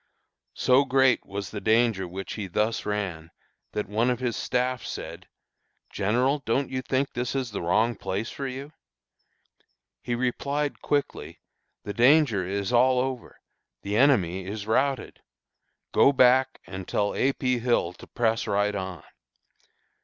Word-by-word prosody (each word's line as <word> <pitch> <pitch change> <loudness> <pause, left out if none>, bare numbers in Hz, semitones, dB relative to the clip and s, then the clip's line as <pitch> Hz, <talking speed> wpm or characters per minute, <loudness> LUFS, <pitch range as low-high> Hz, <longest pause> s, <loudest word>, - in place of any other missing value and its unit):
"So 130 +2 +4
great 130 -2 +2
was 100 0 -5
the 105 - -5
danger 110 -4 +2
which 95 +2 -6
he 105 -3 -5
thus 105 +5 -1
ran, 95 -6 -3 0.4
that 105 - -2
one 110 +4 +1
of 125 -1 0
his 125 -3 -1
staff 125 -1 -1
said: - - -7 0.6
'General, 125 +8 +1
don't 130 +4 0
you 130 0 -2
think 135 +1 -1
this 125 +2 -3
is 130 -4 -2
the 100 - -4
wrong 110 +8 +2
place 100 +1 -4
for 140 - -5
you?' 135 +4 -7 1.3
He 120 - -2
replied 140 +4 -2
quickly: 145 -1 -2 0.4
'The 100 - -5
danger 125 -3 +4
is 100 +3 -2
all 125 +2 +4
over; 130 -1 -4 0.4
the 100 +1 -2
enemy 100 -9 +3
is 100 +1 -5
routed. 130 +4 0 0.7
Go - - +5
back, 130 0 +4
and 95 -1 -8
tell 100 0 0
A. 135 +1 +1
P. 125 -2 0
Hill 115 -7 +1
to - - -14
press 115 -2 0
right 105 0 +1
on.' 95 -5 -5
120 Hz, 145 wpm, -26 LUFS, 100-130 Hz, 1.3 s, Go